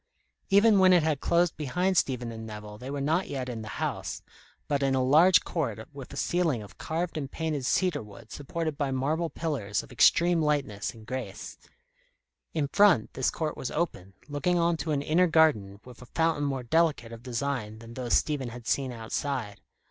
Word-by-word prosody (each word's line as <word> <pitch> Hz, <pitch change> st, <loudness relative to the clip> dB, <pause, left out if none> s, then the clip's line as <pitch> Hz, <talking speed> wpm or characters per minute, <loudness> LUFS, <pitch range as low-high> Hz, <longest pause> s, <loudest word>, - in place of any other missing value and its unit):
Even 205 Hz, +1 st, +6 dB
when 185 Hz, -1 st, +6 dB
it 175 Hz, -3 st, +5 dB
had 155 Hz, -3 st, 0 dB
closed 170 Hz, +2 st, +2 dB
behind 180 Hz, +6 st, 0 dB
Stephen 125 Hz, -7 st, 0 dB
and 110 Hz, 0 st, -7 dB
Nevill, 105 Hz, -1 st, -9 dB
they 125 Hz, +3 st, -7 dB
were 140 Hz, 0 st, -3 dB
not 160 Hz, +7 st, +1 dB
yet 130 Hz, -2 st, -3 dB
in 120 Hz, -3 st, -5 dB
the 110 Hz, -, -8 dB
house, -, -, -3 dB, 0.4 s
but 140 Hz, -1 st, 0 dB
in 135 Hz, -1 st, +2 dB
a 130 Hz, -, +2 dB
large 160 Hz, +8 st, +6 dB
court 115 Hz, -, -3 dB
with 140 Hz, -3 st, -9 dB
a 140 Hz, -, -8 dB
ceiling 160 Hz, -11 st, 0 dB
of 100 Hz, -, -15 dB
carved 165 Hz, 0 st, -2 dB
and 140 Hz, -2 st, -5 dB
painted 155 Hz, -5 st, -2 dB
cedar 180 Hz, -3 st, +1 dB
wood 105 Hz, +1 st, -13 dB
supported 155 Hz, +1 st, -4 dB
by 140 Hz, -2 st, 0 dB
marble 150 Hz, +6 st, -1 dB
pillars 130 Hz, -13 st, -2 dB
of -, -, -15 dB
extreme 170 Hz, +8 st, +4 dB
lightness 140 Hz, -9 st, -1 dB
and 110 Hz, -1 st, -13 dB
grace. 130 Hz, +3 st, -6 dB, 0.9 s
In 150 Hz, -3 st, -1 dB
front, 185 Hz, -, +4 dB
this 130 Hz, -, +1 dB
court 155 Hz, -2 st, -3 dB
was 125 Hz, -, -4 dB
open, 100 Hz, -, -3 dB
looking 160 Hz, +5 st, 0 dB
on 170 Hz, 0 st, +2 dB
to 160 Hz, -, -4 dB
an 140 Hz, -1 st, 0 dB
inner 175 Hz, +5 st, +3 dB
garden 140 Hz, -, +3 dB
with 125 Hz, -1 st, -13 dB
a 125 Hz, -, -12 dB
fountain 160 Hz, -1 st, 0 dB
more 135 Hz, -2 st, -2 dB
delicate 150 Hz, -4 st, +1 dB
of 115 Hz, -1 st, -9 dB
design 125 Hz, -3 st, -3 dB
than 115 Hz, +1 st, -11 dB
those 125 Hz, -1 st, 0 dB
Stephen 140 Hz, -5 st, 0 dB
had 120 Hz, 0 st, -10 dB
seen 135 Hz, 0 st, 0 dB
outside. 115 Hz, -1 st, -4 dB
140 Hz, 195 wpm, -28 LUFS, 120-160 Hz, 0.9 s, Even